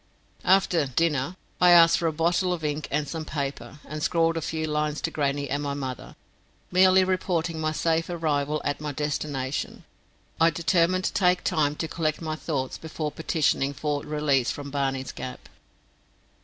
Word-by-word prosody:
After 180 -5 +3
"dinner" 145 +2 0 0.3
I 180 - +7
asked 170 -1 +7
for 170 - 0
a - - +1
bottle 170 +3 +1
of 165 -3 -5
ink 150 0 -2
and 150 0 -1
some 160 +1 -4
paper, 140 -3 -5
and 155 +1 -6
scrawled 165 +1 +2
a 165 - -2
few 160 +1 -2
lines 150 0 -1
to 165 - -2
grannie 140 -1 -1
and 145 +2 -2
my 140 -1 -2
mother, 130 -3 -6 0.6
merely 185 +1 +6
reporting 175 -3 -1
my 155 0 0
safe 165 +1 0
arrival 150 -3 -1
at 145 +1 -2
my 150 -1 -4
destination. 145 -2 -3 0.6
I 165 +1 +6
determined 170 +2 +2
to - - -1
take 180 -2 +2
time 150 -5 +1
to 160 - -3
collect 155 -1 -1
my 155 -1 -3
thoughts 140 -5 -3
before 155 -1 -4
petitioning 150 -3 0
for 145 0 -2
release 150 -4 +1
from 140 -1 -5
Barney's 135 -2 -2
Gap. 125 - -8
155 Hz, 170 wpm, -26 LUFS, 145-165 Hz, 0.6 s, I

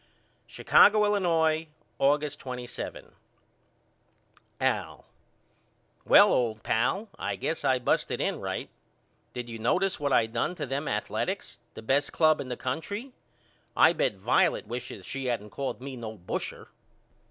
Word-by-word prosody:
Chicago, 210 0 +5
Illinois, 165 -6 +2 0.3
August 145 +1 +1
27. 125 -2 -7 1.5
AL: - - -1 1.0
Well - - +7
old 110 -3 0
pal 190 - 0
I - - -2
guess 160 - -3
I 130 - +3
busted 125 - 0
in - - -1
right. - - -4 0.6
Did 125 -1 -5
you 115 -1 -7
notice 180 - +1
what 145 -1 -1
I 115 - +4
done 115 +10 -2
to 150 - -4
them 140 +3 -3
Athaletics, 105 0 -3 0.2
the - - -9
best 140 +5 +1
ball - - -16
club 155 -2 +4
in 135 - -7
the 125 - -4
country? 200 - -4 0.7
I - - +7
bet - - 0
Violet - - +2
wishes 115 -5 -7
she 135 -1 -4
hadn't 105 -4 -3
called 135 -3 -4
me 135 0 -6
no 110 -3 -7
busher. 90 - -5
135 Hz, 140 wpm, -28 LUFS, 120-160 Hz, 1.5 s, Well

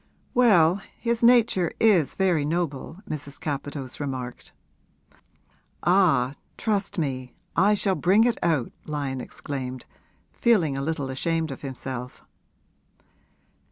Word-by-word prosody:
'Well, 195 -7 +5 0.2
his 235 -1 -1
nature 235 -7 +4
is 195 -10 +4
very 180 -6 +2
noble,' 165 +3 -3
Mrs. 145 -2 -6
Capadose 145 -4 -5
remarked. 130 -4 -5 1.3
'Ah, 175 -8 +3 0.2
trust 205 -2 -1
me, 130 -5 -3 0.2
I 200 +4 +4
shall 195 -1 +1
bring 190 +4 +4
it 240 -1 +1
out!' 155 -8 +1 0.2
Lyon 140 -4 -3
exclaimed, 130 -1 -6 0.5
feeling 180 -12 +2
a 135 - -2
little 145 -2 -2
ashamed 160 +3 -1
of 135 - -8
himself. 130 -2 -6
160 Hz, 110 wpm, -25 LUFS, 135-195 Hz, 1.3 s, Well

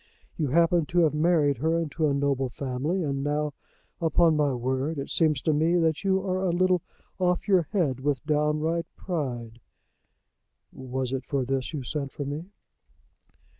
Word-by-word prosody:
You 155 - -1
happen 170 +2 +3
to 175 0 +2
have 155 -3 +3
married 150 -4 +2
her 160 +4 +1
into 160 -1 0
a 145 - +1
noble 140 -2 0
family, 140 +9 -2
and 140 -2 -2
now, 150 0 -1 0.5
upon 165 0 +4
my 150 -2 +2
word, 130 +5 -1
it 140 - -4
seems 155 -5 +2
to 155 - +2
me 160 +4 +2
that 160 -1 +1
you 190 -1 +2
are 185 0 -1
a 185 - +1
little 180 0 +2 0.4
off 180 +1 +1
your 185 -6 +3
head 155 - +1
with 140 0 -1
downright 155 +2 0
pride." 120 - -4 1.1
"Was 130 0 -4
it 135 - -2
for 140 -3 -1
this 135 0 -2
you 150 -5 -4
sent 140 +1 -4
for 145 - -4
me?" 145 +4 -4
150 Hz, 170 wpm, -27 LUFS, 135-170 Hz, 1.1 s, upon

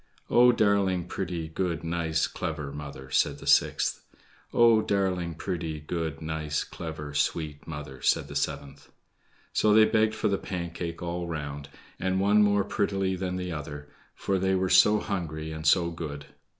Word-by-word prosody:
"Oh, 125 +1 +7
darling, 100 -5 +2
pretty, 90 -3 -4
good, 85 +1 -2
nice, 80 -1 0
clever 75 -3 -4
mother," 70 -2 -8
said - - +2
the - - -11
sixth. - - +2 0.5
"Oh, 115 -2 +5
darling, 95 -5 0
pretty, 80 -3 -4
good, 80 0 -4
nice, 80 -1 -2
clever, 80 -3 -7
sweet 75 0 -1
mother," 75 -4 -7
said - - +2
the - - -9
seventh. 70 0 -4 0.6
So 105 -1 +4
they 110 0 +8
begged 110 0 +2
for - - 0
the 100 -2 0
Pancake 85 -2 -5
all 85 0 -3
round, 75 -3 -5 0.3
the 95 - -1
one 100 +2 +4
more 100 -1 +3
prettily 95 -1 0
than 90 0 -3
the 90 -1 -3
other; 75 -1 -6 0.3
for 95 -1 -1
they 95 +1 +2
were 95 0 0
so 95 +4 +6
hungry 80 -6 -4
and 80 0 -4
so 85 +2 +4
good. 75 -4 -6
85 Hz, 160 wpm, -27 LUFS, 75-95 Hz, 0.6 s, they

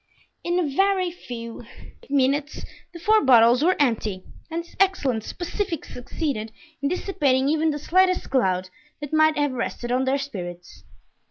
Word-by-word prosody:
In 345 +1 0
a 355 -4 +1
very 375 +4 +1
few 235 -8 -8 0.5
minutes 280 +2 0 0.3
the 340 - -10
four 430 +6 +3
bottles 245 0 +6
were 365 +3 +4
empty 215 -8 0 0.3
and 335 +1 -3
this 345 - -19
excellent 280 - +1
specific 350 - -4
succeeded 245 -3 -4 0.3
in 280 - 0
dissipating 290 -8 +1
even 315 +1 +2
the 295 - -1
slightest 365 +3 +2
cloud 185 -8 +1 0.3
that 295 +1 -7
might 310 0 +4
have 290 -1 +1
rested 240 -1 -4
on 255 +1 +1
their 265 +1 +1
spirits. 175 - -8
280 Hz, 150 wpm, -24 LUFS, 240-340 Hz, 0.5 s, bottles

